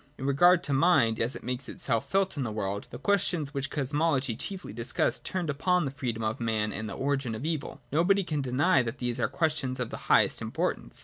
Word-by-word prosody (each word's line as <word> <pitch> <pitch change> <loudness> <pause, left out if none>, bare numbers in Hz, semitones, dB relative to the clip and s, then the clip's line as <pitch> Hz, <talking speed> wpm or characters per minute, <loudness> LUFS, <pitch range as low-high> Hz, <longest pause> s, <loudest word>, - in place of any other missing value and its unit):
In 135 - -5
regard 175 +6 +5
to 145 - -1
Mind 135 -7 +4
as 120 +4 0
it - - -8
makes 125 +2 -3
itself 115 -3 -2
felt 195 -2 +1
in 145 - -3
the 120 -4 -2
world, 100 -1 -3
the - - -8
questions 175 -7 0
which 140 -1 -2
Cosmology 145 -3 0
chiefly 185 - -5
discussed 115 +3 -1
turned 185 -3 -3
upon 175 +4 +1
the 135 - -2
freedom 125 -5 -3
of 110 0 -1
man 110 -3 -1
and 110 0 -4
the - - -5
origin 135 -4 -1
of 125 - -6
evil. 155 -3 -3
Nobody 185 +7 +3
can 150 -4 -2
deny 135 +4 +3
that 115 -1 -4
these 120 -1 -2
are - - +2
questions 150 -6 -1
of - - -2
the - - -8
highest - - +4
importance. - - -2
140 Hz, 220 wpm, -28 LUFS, 120-160 Hz, -, regard